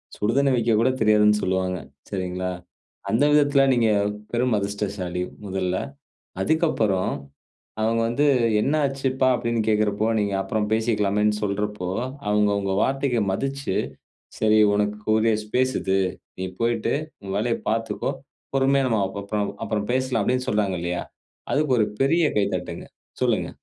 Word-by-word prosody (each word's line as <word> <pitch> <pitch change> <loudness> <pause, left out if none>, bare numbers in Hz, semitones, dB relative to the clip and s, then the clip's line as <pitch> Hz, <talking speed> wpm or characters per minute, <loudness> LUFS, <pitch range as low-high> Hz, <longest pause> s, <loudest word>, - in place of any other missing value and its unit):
சுடுதண்ணி 135 +6 +2
வெக்கக்கூட 115 0 +2
தெரியாதுன்னு 105 -1 +4
சொல்வாங்க. 95 0 0 0.3
சரிங்களா? 90 -1 -3 0.6
அந்த 115 +6 +3
விதத்துல 145 -2 +4
நீங்க 115 -2 +3 0.4
பெரும் 120 -1 +2
அதிர்ஷ்டசாலி 100 -3 -3 0.2
முதல்ல. 95 -1 -1 0.7
அதுக்கப்புறம், 115 - +1 0.7
அவங்க 115 +1 +2
வந்து 145 +5 +1 0.4
என்ன 145 - +1
ஆச்சுப்பா? 135 -1 0
அப்டின்னு 115 -2 -1
கேட்குறப்போ, 105 0 +1
நீங்க 100 -1 -1
அப்புறம் 105 +2 -1
பேசிக்கலாமேனு 105 -2 +1
சொல்றப்போ, 105 -2 -2 0.4
அவங்க 105 0 +3
உங்க 95 -1 -1
வார்த்தைக்கு 135 -4 0
மதிச்சு, 135 0 -2 0.6
சரி 110 0 +4 0.2
உனக்குரிய 105 +2 +1
ஸ்பேஸ் 130 +4 0
இது. 95 0 +2 0.4
நீ 95 - -2 0.2
போய்ட்டு 115 +1 +1 0.3
உன் 95 0 -5
வேலய 115 +2 +1
பாத்துக்கோ. 115 +1 -1 0.4
பொறுமையா 135 0 +3
நம்ம 115 -4 +1
அப்புறம் 100 +1 -6
பா 105 - 0 0.2
அப்புறம் 105 -1 -2
பேசலாமே 130 -2 +1
சொன்னாங்கலையா, 90 -5 -1 0.5
அதுக்கு 150 -2 +1
ஒரு 105 - +4 0.2
பெரிய 165 +5 +3
கைத்தட்டுங்க. 90 -4 -2 0.4
சொல்லுங்க. - - +1
110 Hz, 120 wpm, -24 LUFS, 100-125 Hz, 0.7 s, தெரியாதுன்னு